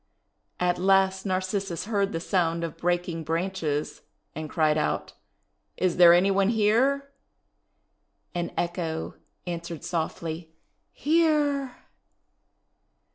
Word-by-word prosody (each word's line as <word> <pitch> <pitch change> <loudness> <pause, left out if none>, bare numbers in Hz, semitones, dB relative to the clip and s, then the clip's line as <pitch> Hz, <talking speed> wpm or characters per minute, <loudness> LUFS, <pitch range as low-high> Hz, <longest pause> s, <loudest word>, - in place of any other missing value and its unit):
At 180 0 +1
last 190 +1 +3
Narcissus 185 -1 -2
heard 200 -2 0
the 165 - -2
sound 170 -2 0
of 165 - -4
breaking 175 -1 -1
branches, 165 -2 -2 0.3
and 155 -1 -6
cried 155 -1 +2
out, 150 -1 -1 0.6
"Is 185 -2 0
there 175 -1 +9
any 180 +3 +5
one 195 +1 +3
here?" 245 +6 +2 1.2
And 175 -1 -2
Echo 170 -2 -2 0.3
answered 170 -2 -5
softly, 160 -1 -4 0.4
"Here! 295 -4 +1
180 Hz, 100 wpm, -26 LUFS, 165-200 Hz, 1.2 s, there